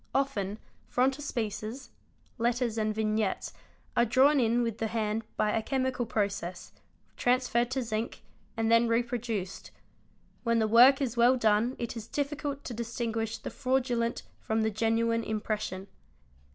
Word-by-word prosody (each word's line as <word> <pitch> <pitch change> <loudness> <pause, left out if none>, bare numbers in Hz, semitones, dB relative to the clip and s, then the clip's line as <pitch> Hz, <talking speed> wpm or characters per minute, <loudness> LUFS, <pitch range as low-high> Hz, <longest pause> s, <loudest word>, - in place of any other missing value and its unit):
Often 215 -8 0 0.3
frontispieces 250 -3 -1 0.5
(letters 235 -1 0
and 215 0 +1
vignettes) 215 -2 -1 0.4
are 235 - +5
drawn 270 +5 +4
in 240 0 +2
with 230 -2 -3
the 225 - 0
hand 220 0 -1
by 210 - +2
a 225 - +1
chemical 255 0 -1
process, 200 -5 -2 0.5
transferred 245 -1 +2
to 260 0 -1
zinc, 220 0 -4 0.3
and 225 0 +1
then 230 +1 +5
reproduced; 230 -4 -2 0.7
when 230 -1 +1
the 220 -1 +2
work 250 +5 +7
is 245 -2 -3
well 240 +2 +6
done 225 +2 +2
it 235 0 -4
is 225 -1 -7
difficult 285 0 -3
to 245 - -5
distinguish 225 -1 -3
the - - -7
fraudulent 250 -3 0 0.2
from 220 0 0
the 220 - +1
genuine 230 +1 +1
impression. 215 -3 -3
230 Hz, 140 wpm, -29 LUFS, 220-245 Hz, 0.7 s, work